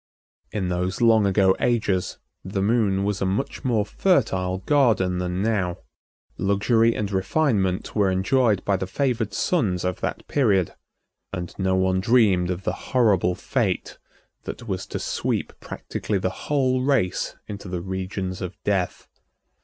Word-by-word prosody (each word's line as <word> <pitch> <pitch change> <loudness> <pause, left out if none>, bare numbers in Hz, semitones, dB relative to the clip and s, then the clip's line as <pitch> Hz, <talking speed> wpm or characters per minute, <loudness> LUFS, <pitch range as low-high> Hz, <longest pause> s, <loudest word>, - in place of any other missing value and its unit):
In 95 -4 -2
those 90 +1 -1
long 110 -3 +5
ago 95 -1 +4
ages 105 -6 0 0.3
the 95 +1 -2
Moon 100 -3 +2
was 100 0 -1
a - - +2
much 100 +8 -2
more 115 -5 +1
fertile 100 - +1
garden 95 -6 +2
than 90 +1 -2
now. 100 -6 0 0.6
Luxury 110 +4 +3
and 105 -1 -2
refinement 95 -2 0
were 100 -3 +3
enjoyed 100 +3 +2
by 100 -1 +2
the 95 - -4
favored 115 -1 -1
sons 100 - 0
of 90 -1 -2
that - - -3
period, 100 - +2 0.6
and 85 -1 -5
no 95 0 +1
one 95 0 +2
dreamed 100 -5 +3
of 90 +1 -3
the - - -1 0.2
horrible 100 -8 +3
fate 115 -7 -2 0.5
that - - -7
was - - -3
to - - -4
sweep - - -2
practically 105 - -4
the 95 0 -4
whole 130 -3 +2
race 130 -9 0
into 100 -1 -7
the 90 -1 -4
regions 95 0 -4
of 90 0 -5
death. 95 -3 -1
100 Hz, 145 wpm, -24 LUFS, 95-115 Hz, 0.6 s, long